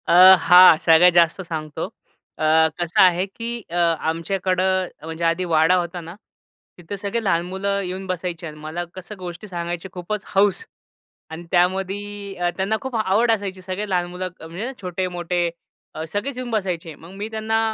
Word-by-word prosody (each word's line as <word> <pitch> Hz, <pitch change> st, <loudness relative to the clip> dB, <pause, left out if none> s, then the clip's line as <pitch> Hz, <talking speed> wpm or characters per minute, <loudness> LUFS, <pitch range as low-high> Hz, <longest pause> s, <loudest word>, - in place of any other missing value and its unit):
अ, -, -, +3 dB, 0.3 s
हां, 180 Hz, -1 st, +8 dB
सगळ्यात 165 Hz, +2 st, +7 dB
जास्त 170 Hz, +2 st, +3 dB
सांगतो 155 Hz, -4 st, -5 dB, 0.5 s
अ, -, -, -4 dB, 0.4 s
कसं 170 Hz, -1 st, +2 dB
आहे, 180 Hz, 0 st, +4 dB
की 230 Hz, +4 st, -6 dB
अ, 170 Hz, -, -6 dB, 0.2 s
आमच्याकडे 185 Hz, +3 st, -1 dB, 0.4 s
म्हणजे 165 Hz, +1 st, -6 dB
आधी 165 Hz, +2 st, +1 dB
वाडा 165 Hz, +1 st, +4 dB
होता 175 Hz, 0 st, -2 dB
ना. 170 Hz, +2 st, -10 dB, 0.6 s
तिथे 175 Hz, +3 st, -7 dB
सगळे 205 Hz, +4 st, -3 dB
लहान 170 Hz, -5 st, +2 dB
मुलं 200 Hz, +2 st, -2 dB
येऊन 185 Hz, +1 st, -5 dB
बसायचे 180 Hz, -1 st, -4 dB
अन् 155 Hz, -, -9 dB
मला 155 Hz, +3 st, -5 dB
कसं 185 Hz, +3 st, -9 dB
गोष्टी 180 Hz, +3 st, -8 dB
सांगायची 175 Hz, -1 st, -5 dB
खूपच 190 Hz, +3 st, -4 dB
हौस 195 Hz, -1 st, +2 dB, 0.7 s
आणि 160 Hz, +2 st, -8 dB
त्यामध्ये 195 Hz, +1 st, -1 dB
त्यांना 195 Hz, +3 st, 0 dB
खूप 265 Hz, -2 st, -5 dB
आवड 220 Hz, +2 st, +2 dB
असायची 195 Hz, -4 st, -2 dB
सगळे 190 Hz, +3 st, -5 dB
लहान 180 Hz, -2 st, +1 dB
मुलं 185 Hz, +1 st, -4 dB
म्हणजे 175 Hz, +10 st, -6 dB
छोटे, 185 Hz, 0 st, -2 dB
मोठे 175 Hz, -1 st, -1 dB, 0.6 s
सगळेच 245 Hz, +6 st, -3 dB
येऊन 255 Hz, -1 st, -5 dB
बसायचे. 180 Hz, -7 st, -2 dB
मग 165 Hz, +4 st, -14 dB
मी 215 Hz, -, -3 dB
त्यांना 220 Hz, 0 st, -1 dB
185 Hz, 160 wpm, -22 LUFS, 170-200 Hz, 0.7 s, हां